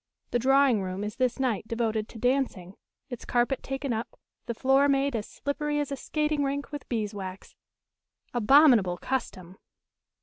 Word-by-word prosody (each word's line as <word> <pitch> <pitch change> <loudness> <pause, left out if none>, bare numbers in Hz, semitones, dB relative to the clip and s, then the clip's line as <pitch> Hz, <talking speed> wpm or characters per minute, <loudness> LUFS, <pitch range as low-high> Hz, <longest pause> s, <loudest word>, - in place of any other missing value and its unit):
The 240 - +1
drawing 270 -3 +4
room 185 +1 -4
is 210 +2 -5
this 255 -2 +1
night 235 -5 -1
devoted 225 -2 -1
to - - -11
dancing; 245 -7 -1 0.4
its 245 - -6
carpet 245 +2 0
taken 270 -1 -3
up, 225 +2 -5 0.3
the 235 - -3
floor 270 +3 +3
made 275 -1 +1
as 215 -2 -3
slippery 295 +1 -2
as 290 -1 -2
a - - -1
skating 300 +1 -1
rink 280 +1 -3
with 290 -1 -7
beeswax 205 -5 -4 0.8
abominable 240 - +5
custom! 190 -7 -4
245 Hz, 155 wpm, -27 LUFS, 215-275 Hz, 0.8 s, abominable